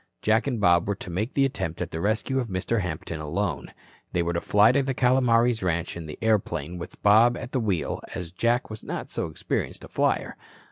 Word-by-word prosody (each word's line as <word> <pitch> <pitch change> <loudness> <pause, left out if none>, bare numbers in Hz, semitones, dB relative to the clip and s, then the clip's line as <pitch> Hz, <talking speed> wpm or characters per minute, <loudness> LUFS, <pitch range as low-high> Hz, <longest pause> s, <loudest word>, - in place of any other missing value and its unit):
Jack 110 +5 +3
and 125 -5 -1
Bob 85 -3 +4
were 100 - 0
to 95 - -8
make 105 +9 -2
the 140 - +4
attempt 85 -11 -3
at - - -3
the 80 - -4
rescue 110 +6 0
of 125 - -2
Mr. 100 +3 -1
Hampton 80 -2 -4
alone. 80 0 -2 0.4
They 85 - +2
were 85 0 -1
to 85 - -1
fly 105 +2 +5
to 140 - +3
the 135 -1 -2
Calomares 125 -2 +3
ranch 85 -2 -1
in 85 -2 -7
the 75 - -7
airplane 90 -7 0
with 85 - -9
Bob 110 +4 +6
at 125 - -7
the 130 - 0
wheel, 100 -7 -1
as 85 -2 -5
Jack 120 +5 0
was 110 - -8
not - - -5
so - - -2
experienced 80 - -3
a - - -9
flyer. - - 0
105 Hz, 220 wpm, -26 LUFS, 85-120 Hz, 0.4 s, Bob